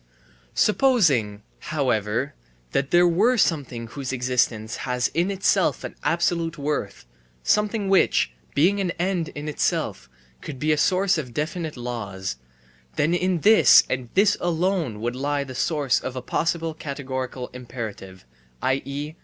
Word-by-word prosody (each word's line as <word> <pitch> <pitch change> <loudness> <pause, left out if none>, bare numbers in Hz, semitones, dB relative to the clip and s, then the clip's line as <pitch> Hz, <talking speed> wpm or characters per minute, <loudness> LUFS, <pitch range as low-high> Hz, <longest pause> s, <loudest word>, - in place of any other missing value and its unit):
Supposing, 160 - +2 0.2
however, 125 -4 -1 0.4
that 135 0 0
there 175 0 +5
were 210 +9 +3
something 140 - 0
whose 125 +3 -6
existence 125 -3 0
has 125 -1 -1
in 175 +4 0
itself 195 -1 +1
an - - -6
absolute 170 +1 0
worth, 145 -9 -3 0.4
something 210 - +1
which, 190 - +3 0.2
being 180 +8 +3
an 185 - -1
end 175 -2 0
in 145 +1 -6
itself, 150 - -1 0.3
could 135 - -7
be 155 +4 0
a - - +4
source 185 +1 +2
of 125 -6 -7
definite 155 0 -3
laws; 100 - -5 0.6
then 155 +4 +2
in 180 -1 0
this 220 +5 +7
and 130 -2 -2
this 200 +1 +4
alone 175 - 0
would 120 +2 -2
lie 140 +2 -1
the 130 -1 -9
source 140 -4 +1
of 130 - -6
a 130 - -4
possible 165 +3 -1
categorical 130 -4 -5
imperative, 115 - -8 0.4
i.e. 140 +3 -2
145 Hz, 135 wpm, -24 LUFS, 125-175 Hz, 0.6 s, this